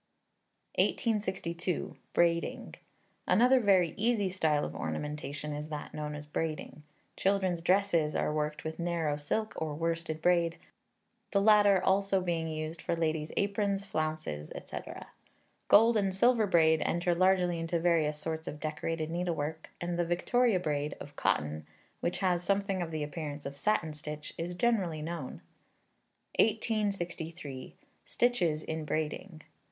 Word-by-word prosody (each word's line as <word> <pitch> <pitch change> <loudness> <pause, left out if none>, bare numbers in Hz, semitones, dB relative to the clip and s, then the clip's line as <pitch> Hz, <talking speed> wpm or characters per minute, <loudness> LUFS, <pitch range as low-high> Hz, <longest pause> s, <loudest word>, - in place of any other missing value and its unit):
1862. 190 -6 0 0.2
Braiding. 170 -1 +1 0.5
Another 250 +6 +5
very 190 -7 +4
easy 215 -2 +2
style 160 -5 +1
of - - -6
ornamentation 150 0 -4
is 150 +1 -5
that 150 -1 -6
known 150 -1 -4
as 150 0 -7
braiding. 155 0 -4 0.3
Children's 190 -3 +1
dresses 180 -4 +2
are - - 0
worked 150 +2 -2
with 160 +1 -5
narrow 170 -3 0
silk 215 +9 -2
or 155 -2 -2
worsted 165 0 -2
braid, 170 0 +2 0.7
the 200 - +2
latter 205 -1 +6
being 185 - +1
also 195 -1 +2
used 160 -1 -2
for - - -1
ladies' 160 -2 -1
aprons, 200 -1 0
flounces, 155 - -3
&c. - - -6 0.9
Gold 225 +2 +6
and 195 -2 +1
silver 230 +1 +4
braid 160 -3 +4
enter 175 +1 +1
largely 180 -1 +3
into 165 +1 -1
various 160 -3 +2
sorts 160 +1 -4
of 150 - -5
decorated 155 +1 -3
needlework, 160 -3 -2
and 175 0 -2
the - - +4
Victoria 195 +5 +2
braid, 150 -3 -2
of 145 - -10
cotton, 75 -5 0 0.3
which 175 - -1
has 180 -2 +1
something 195 0 0
of 170 - -2
the 155 -2 -3
appearance 150 -1 -5
of 140 0 -5
satin 160 0 0
stitch, 150 0 -6
is 175 +2 -4
generally 180 -8 +1
known. 160 -5 -5 1.0
1863. 180 - -1 0.3
Stitches 175 -11 +1
in 160 0 -3
Braiding. 155 +2 -3
170 Hz, 135 wpm, -31 LUFS, 155-190 Hz, 1.0 s, latter